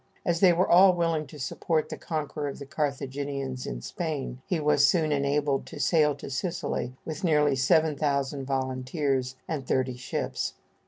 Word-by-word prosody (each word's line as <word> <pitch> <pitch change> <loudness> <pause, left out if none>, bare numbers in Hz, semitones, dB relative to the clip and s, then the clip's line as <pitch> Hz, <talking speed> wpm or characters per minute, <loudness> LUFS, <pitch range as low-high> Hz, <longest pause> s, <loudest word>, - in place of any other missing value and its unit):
As 170 -1 +1
they 185 -1 +7
were 175 +2 +2
all 185 +1 +7
willing 165 -3 0
to 150 - -11
support 155 +3 -1
the - - -4
conqueror 150 -2 -3
of 140 - -5
the 140 - -8
Carthaginians 140 -2 -3
in - - -5
Spain, 145 - -4
he 175 - 0
was 150 -1 +4
soon 160 -4 +2
enabled 140 0 +1
to - - -9
sail 150 0 +3
to - - -8
Sicily 130 -3 -2
with 160 +4 -5
nearly 150 -4 +3
seven 150 +4 +3
thousand 140 -2 -1
volunteers 130 0 -1
and 140 -5 -4
thirty 130 -1 0
ships. 125 - -3
145 Hz, 165 wpm, -27 LUFS, 135-160 Hz, -, they